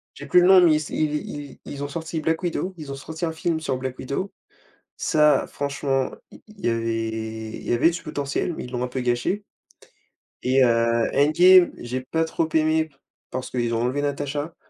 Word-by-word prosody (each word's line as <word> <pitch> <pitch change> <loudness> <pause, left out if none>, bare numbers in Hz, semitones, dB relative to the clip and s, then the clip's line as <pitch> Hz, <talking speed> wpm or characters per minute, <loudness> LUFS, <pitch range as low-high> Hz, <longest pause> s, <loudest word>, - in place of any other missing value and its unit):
J'ai 140 - -9
plus 180 +5 +5
le 180 - +5
nom, 190 -1 +8
mais 170 -3 +6
ils - - +4
s 155 - -5
ils 150 -1 0
ils 145 -1 -8
ils 140 0 -6
ont - - -2
sorti 160 +2 -4
Black 160 +2 0
Widow, 180 +1 -2
ils 150 -3 -7
ont - - -4
sorti 160 +5 -5
un 160 - -2
film 160 0 -1
sur 135 -5 -2
Black 130 0 -5
Widow. 140 +9 -3 0.7
Ça, 150 -2 +3
franchement, 140 -2 -1 0.2
i - - -15
il 215 -3 -15
y - - +4
avait 110 -1 -2
il - - -10
y - - -2
avait 145 +8 +4
du 175 - -5
potentiel, 145 +2 -2
mais - - -6
ils 125 - -8
l'ont 125 -1 -2
un 125 - -1
peu 130 +1 -4
gâché 125 +12 -1 1.0
et 130 +1 +3
heu, 115 -1 +2
Endgame, 175 +5 +6
j'ai 125 +2 -4
pas 160 +6 -1
trop 160 0 -1
aimé 155 0 +3
p 145 - -29 0.3
parce 130 0 -5
qu'ils 120 -2 -1
ont 115 - 0
enlevé 130 +4 0
Natasha. 145 +2 -3
145 Hz, 210 wpm, -24 LUFS, 125-160 Hz, 1.0 s, nom